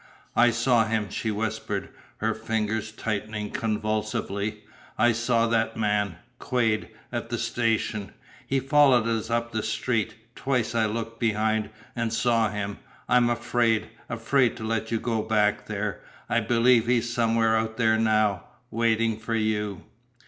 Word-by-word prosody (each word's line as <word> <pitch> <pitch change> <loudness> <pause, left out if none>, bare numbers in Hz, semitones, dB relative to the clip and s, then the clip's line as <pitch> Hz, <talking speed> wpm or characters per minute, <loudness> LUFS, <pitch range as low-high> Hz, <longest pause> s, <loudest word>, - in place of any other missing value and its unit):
"I 120 - +6
saw 120 0 +3
him," 110 -3 -1
she 110 - -2
whispered, 110 +1 -3 0.3
her - - 0
fingers 110 0 -2
tightening 105 -1 -3
convulsively. 110 -1 -2 0.3
"I 120 - +5
saw 115 0 +2
that 115 -1 +1
man 105 -4 0 0.2
Quade 115 -4 0 0.2
at - - -4
the - - -2
station. 110 -4 -1 0.4
He 135 - +1
followed 135 -4 +4
us 115 -1 -1
up 115 0 -1
the 110 -1 -1
street. 110 0 -1 0.2
Twice 125 -4 -1
I 115 -2 +2
looked 115 +1 -4
behind 110 -2 +1 0.3
and 115 -2 -1
saw 115 -1 +2
him. 100 0 -4 0.3
I 125 - +4
am 120 -1 +4
afraid 120 -2 +1 0.2
afraid 120 +2 +1
to - - -7
let 110 0 -1
you 115 - 0
go 115 -2 -1
back 105 -1 +1
there. 105 -1 -3 0.3
I - - +2
believe 120 -1 +3
he 125 0 +4
is 120 0 -2
somewhere 115 -1 +2
out 110 0 -1
there 110 -2 +3
now 110 -4 +2 0.3
waiting 115 -1 +1
for 115 +1 -2
you!" 105 -3 -1
110 Hz, 150 wpm, -26 LUFS, 110-115 Hz, 0.4 s, I